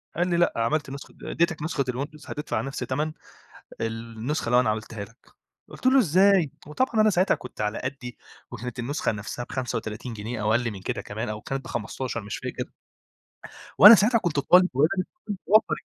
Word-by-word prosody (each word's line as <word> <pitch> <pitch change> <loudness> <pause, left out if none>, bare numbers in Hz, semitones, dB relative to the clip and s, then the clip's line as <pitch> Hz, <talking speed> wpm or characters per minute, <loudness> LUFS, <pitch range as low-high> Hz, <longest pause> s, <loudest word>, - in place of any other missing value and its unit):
قال 175 +3 +1
لي: 170 - +1
"لأ 175 - +3
عملت 135 +6 0
نسخة 140 +1 -9
آآ، - - -4
اديتك 170 -2 0
نسخة 155 -2 -1
الWindows 145 +4 -7
هتدفع 150 +1 -3
نفس 135 0 -5
تَمن 145 +5 -2 0.7
النسخة 115 +5 -3
اللي 125 +1 +4
أنا 110 - +1
عملتها 110 -1 -4
لك" 115 +4 -21 0.4
قُلت - - -7
له: 265 +1 +6
"إزاي!" 190 - +4 0.2
وطبعًا 220 - 0
أنا 215 - +5
ساعتها 185 0 +3
كنت 125 - -10
على 105 +1 -1
قدّي 130 -2 -6 0.3
وكانت 125 +1 -7
النسخة 130 +1 -1
نفسها 105 +4 -5
ب35 120 -2 -4
جنيه 110 +1 -5
أو 105 - +1
أقل 120 0 +1
من 100 - -8
كده - - -3
كمان 110 +3 -5
أو 105 0 -4
كانت 135 +3 -4
ب15 120 +2 -4
مش 105 - -5
فاكر. - - -6 1.1
وأنا 210 +4 +12
ساعتها 225 +3 +4
كنت 175 -7 -2
طالب 180 +5 +5
وارد 140 +4 +4 0.3
اكون 205 -7 -4
باوفّر 215 +2 +5
135 Hz, 180 wpm, -25 LUFS, 115-170 Hz, 1.1 s, وأنا